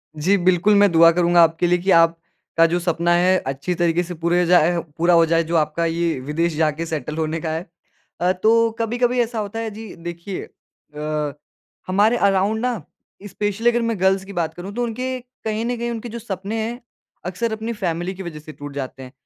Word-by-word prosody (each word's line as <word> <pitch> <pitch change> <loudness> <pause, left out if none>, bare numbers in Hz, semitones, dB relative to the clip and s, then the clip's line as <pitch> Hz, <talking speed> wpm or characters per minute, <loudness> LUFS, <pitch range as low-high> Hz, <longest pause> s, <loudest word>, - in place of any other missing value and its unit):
जी, 185 +7 +2
बिल्कुल, 185 +3 +3
मैं 200 -2 +5
दुआ 165 0 +7
करूँगा 175 0 +4
आपके 165 +2 +2
लिए 180 0 +3
कि 190 +2 0
आपका 165 0 +2
जो 175 - +2
सपना 170 0 0
है 185 +2 +4
अच्छी 140 +7 -2
तरीके 175 0 +1
से 175 +1 -7
पूरे 170 +2 0
हो 180 - +2
जाए 175 0 +4 0.2
पूरा 170 +1 +3
हो 165 -1 +6
जाए, 165 +1 +2
जो 165 +1 -3
आपका 155 +2 +1
ये 165 -3 0
विदेश 155 +4 -1
जाके 160 +1 0
सेटल 155 -1 -4
होने 160 0 -1
का 160 - -3
है। 160 +3 -3 0.6
अ, 180 +1 +3
तो 225 +4 +3
कभी-कभी 245 +2 0
ऐसा 230 -1 -2
होता 210 +2 -4
है 225 -1 -3
जी 220 -1 -9
देखिए, 170 +2 -6 0.5
अ, 150 -1 -2 0.5
हमारे 210 +6 +3
अराउंड 200 +2 +2
ना, 245 -7 -1 0.5
स्पेशली 210 +4 0
अगर 240 0 +1
मैं 230 -4 -1
गर्ल्स 190 0 +2
की 200 - -9
बात 165 -3 -2
करूँ, 185 +4 -8
तो 245 - -1
उनके 255 +2 -3 0.2
कहीं 220 +1 -2
न 245 0 -2
कहीं 235 0 -3
उनके 230 +1 -5
जो 235 +1 -6
सपने 205 +1 -4
है, 240 +2 -4 0.5
अक्सर 205 +6 -2
अपनी 220 +2 -4
फैमिली 175 -2 -2
की 190 - -7
वज़ह 160 -3 -7
से 155 +1 -11
टूट 145 -1 -9
जाते 135 -1 -5
हैं। 125 - -11
180 Hz, 210 wpm, -21 LUFS, 165-215 Hz, 0.6 s, दुआ